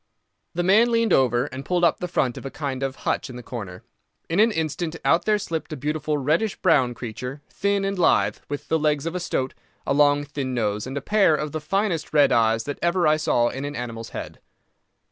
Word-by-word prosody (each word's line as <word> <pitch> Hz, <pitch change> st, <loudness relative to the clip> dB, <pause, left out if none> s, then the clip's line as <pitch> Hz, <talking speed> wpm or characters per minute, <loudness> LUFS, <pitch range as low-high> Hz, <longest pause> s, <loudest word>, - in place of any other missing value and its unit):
The 175 Hz, -, 0 dB
man 215 Hz, +6 st, +5 dB
leaned 230 Hz, -1 st, +2 dB
over 125 Hz, -1 st, +3 dB
and 135 Hz, -1 st, -7 dB
pulled 175 Hz, +4 st, 0 dB
up 170 Hz, -, +3 dB
the 180 Hz, -, -3 dB
front 130 Hz, -8 st, 0 dB
of -, -, -8 dB
a 135 Hz, -, -4 dB
kind 135 Hz, -2 st, -4 dB
of 135 Hz, -1 st, -2 dB
hutch -, -, -1 dB
in 125 Hz, -, -8 dB
the 125 Hz, -, -8 dB
corner. 100 Hz, -8 st, -7 dB, 0.5 s
In 165 Hz, +4 st, 0 dB
an 220 Hz, +2 st, +6 dB
instant 160 Hz, -1 st, -2 dB
out 165 Hz, -, +3 dB
there 215 Hz, -1 st, +3 dB
slipped 165 Hz, -6 st, -4 dB
a -, -, -5 dB
beautiful 150 Hz, +2 st, -1 dB
reddish 155 Hz, +10 st, +1 dB
brown 135 Hz, -9 st, +2 dB
creature, 125 Hz, +5 st, -6 dB
thin 200 Hz, 0 st, 0 dB
and 195 Hz, -1 st, -2 dB
lithe, 105 Hz, -, +3 dB
with 145 Hz, 0 st, -5 dB
the 160 Hz, -, +1 dB
legs 150 Hz, -1 st, +1 dB
of 165 Hz, -, -2 dB
a 180 Hz, -, -2 dB
stoat, 135 Hz, -6 st, -2 dB, 0.3 s
a -, -, +1 dB
long, 145 Hz, 0 st, +4 dB
thin 140 Hz, -3 st, -4 dB
nose, 105 Hz, -1 st, -1 dB
and 135 Hz, +2 st, -5 dB
a -, -, -2 dB
pair 200 Hz, -2 st, +3 dB
of 150 Hz, 0 st, -3 dB
the 155 Hz, -, -4 dB
finest 175 Hz, +1 st, -1 dB
red 145 Hz, -2 st, +5 dB
eyes 115 Hz, -1 st, +3 dB
that 145 Hz, 0 st, -5 dB
ever 170 Hz, +1 st, +2 dB
I 155 Hz, 0 st, +4 dB
saw 120 Hz, -6 st, +2 dB
in 135 Hz, -, -5 dB
an 145 Hz, 0 st, -4 dB
animal's 115 Hz, -2 st, -5 dB
head. -, -, -7 dB
145 Hz, 225 wpm, -24 LUFS, 130-170 Hz, 0.5 s, an